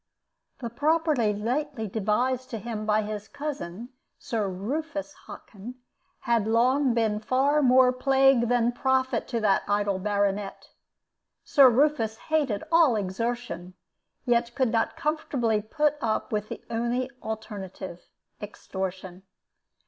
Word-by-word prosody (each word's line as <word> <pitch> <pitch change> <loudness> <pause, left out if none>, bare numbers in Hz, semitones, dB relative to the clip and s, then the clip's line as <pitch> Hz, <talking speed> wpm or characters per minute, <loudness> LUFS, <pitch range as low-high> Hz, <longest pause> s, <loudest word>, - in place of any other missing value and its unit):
The 235 -2 -4
property 295 -4 +2
lately 240 +4 -2
devised 240 +6 -1
to 230 - -4
him 215 0 -5
by 215 0 +2
his 210 0 -5
cousin, 240 - -6 0.3
Sir 215 -4 -2
Rufus 295 - -4
Hockin, 225 +4 -10 0.5
had 235 -4 +1
long 250 +3 +3
been 220 -2 +1
far 270 +7 +2
more 255 -1 +5
plague 270 -1 +3
than 240 -1 +2
profit 260 +1 0
to 235 - -2
that 200 -2 +3
idle 205 -1 0
baronet. 200 0 -1 0.7
Sir 275 -3 +6
Rufus 245 -4 +2
hated 280 -8 -1
all 330 -7 +5
exertion, 200 -2 -3 0.5
yet 235 -1 +1
could 260 -4 +1
not 225 -1 0
comfortably 260 -8 0
put 300 +7 0
up 220 -2 -1
with 210 -1 -2
the - - -7
only 240 +3 -1
alternative 200 -5 -7 0.4
extortion. 190 -2 -6
235 Hz, 120 wpm, -26 LUFS, 210-260 Hz, 0.7 s, Sir